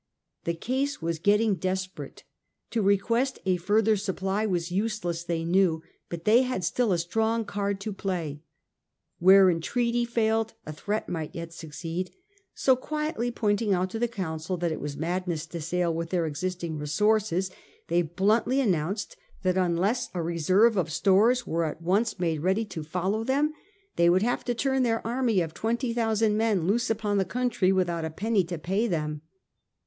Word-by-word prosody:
The 170 - 0
case 265 +10 -2
was 165 -1 -2
getting 210 +4 +3
desperate. 185 0 -4 0.5
To 230 - 0
request 230 +7 +2
a 185 -1 +2
further 215 +5 +2
supply 195 +1 -1
was 175 -3 -1
useless 185 -4 -1
they 170 -1 -2
knew, 170 -2 +2 0.3
but 170 -1 -6
they 225 +4 +6
had 255 -7 -2
still 230 +5 +1
a 180 - +3
strong 220 +6 0
card 200 -1 -2
to 210 +1 -4
play. 170 -7 -3 0.8
Where 190 +2 +7
entreaty 235 +8 +1
failed 225 -1 0
a 155 - -6
threat 210 +7 -3
might 160 -3 -4
yet 165 0 -6
succeed; 165 +3 -5 0.5
so 260 - +4
quietly 300 -1 -2
pointing 210 -3 +1
out 185 +1 -1
to 225 - -4
the 240 - +2
Council 180 -5 -4
that 170 -1 -1
it 155 - -3
was 145 0 -5
madness 170 0 -2
to 170 0 -7
sail 175 +1 0
with 165 0 -3
their 175 -2 0
existing 170 +1 -3
resources, 190 +4 +1 0.4
they 170 +1 +2
bluntly 210 - +1
announced 195 - -1 0.3
that 185 -1 +2
unless 190 +7 +1
a 175 - -1
reserve 185 +7 +3
of 165 -3 0
stores 215 +9 +3
was 165 -1 0
at - - -22
once 205 +7 +1
made 165 -4 0
ready 190 +6 +1
to 180 -6 -6
follow 185 +7 -1
them, 285 +5 +1 0.4
'they 170 0 +5
would 185 +3 +4
have 245 +2 0
to 245 - -1
turn 265 +2 +1
their 230 -2 0
army 235 -4 +1
of 160 -2 -3
twenty 235 +2 -1
thousand 225 -2 +1
men 215 -6 +1
loose 235 +7 +1
upon 210 -2 0
the - - +3
country 225 -2 +1
without 175 -3 0
a 160 - -2
penny 205 +4 +1
to 170 0 -5
pay 195 +9 0
them. 150 -5 -2
190 Hz, 175 wpm, -27 LUFS, 170-225 Hz, 0.8 s, Where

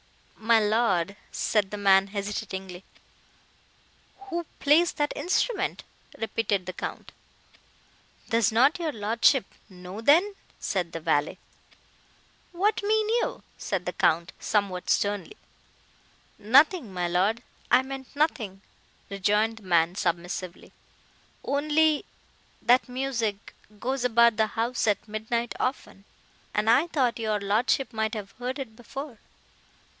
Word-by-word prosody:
"My 225 +1 +3
lord!" 205 -4 +1 0.2
said 210 -3 0
the 210 - -5
man, 195 -1 +4
hesitatingly. 195 -2 -5 1.4
"Who 345 -3 -4
plays 315 +4 +4
that 295 0 -1
instrument?" 380 +2 -1 0.3
repeated 215 -4 -1
the 185 - -5
Count. - - -6 1.2
"Does 230 -2 +2
not 265 +10 +4
your 325 -3 -1
lordship 230 +3 +2 0.2
know, 185 +2 -9
then?" 340 - +4 0.3
said 180 -4 -2
the 165 - -5
valet. 145 -1 0 1.1
"What 400 +5 +1
mean 430 +1 +1
you?" 470 +1 -1 0.2
said 185 -3 -3
the 180 - -3
Count, 170 +2 +1
somewhat 200 -4 -1
sternly. 205 - 0 1.0
"Nothing, 265 - +4
my 180 -1 -2
Lord, 195 +7 +1 0.3
I 255 - +5
meant 265 -1 -8
nothing," 220 -10 -1 0.5
rejoined 210 +3 +1
the 220 - -14
man 170 -2 +2
submissively—"Only—that 245 - -2
music—goes 245 -1 -4
about 235 -2 +4
the 220 -1 +3
house 230 +2 -1
at 205 0 0
midnight 220 +2 -2
often, 255 -6 -3 0.5
and 210 +1 +1
I 295 +8 +4
thought 260 -8 0
your 215 -2 0
lordship 220 +6 0
might 220 +1 -1
have 200 -2 -6
heard 250 +3 -5
it 255 -6 -7
before." 245 +1 -8
225 Hz, 115 wpm, -26 LUFS, 200-270 Hz, 1.4 s, I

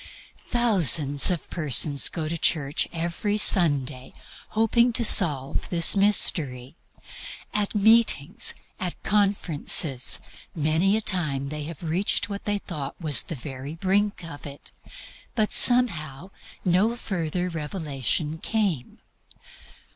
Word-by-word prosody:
Thousands 170 - +4
of 175 -3 -2
persons 145 -3 +1
go 160 -3 -6
to 165 - -4
church 150 -2 0
every 170 +5 -4
Sunday 145 -10 0 0.3
hoping 235 +2 +1
to 235 0 +1
solve 145 -10 +3
this 170 +1 +4
mystery. 155 -10 +1 0.8
At 210 0 -3
meetings, 220 - +2 0.2
at 180 -3 -5
conferences, 175 -9 +1 0.4
many 160 +6 0
a - - -3
time 150 -9 -2
they 150 0 -7
have 165 +1 -10
reached 175 +6 -1
what 200 0 -8
they 205 0 -2
thought 150 -8 -8
was 150 -7 +4
the 165 - -8
very 135 +2 -9
brink 195 +2 -2
of 150 -3 -10
it, 140 0 -13 0.6
but 215 -2 -1
somehow 180 - +2 0.3
no 190 +6 +1
further 180 -5 -4
revelation 155 -1 -4
came. 190 - -3
170 Hz, 115 wpm, -23 LUFS, 145-205 Hz, 0.8 s, Thousands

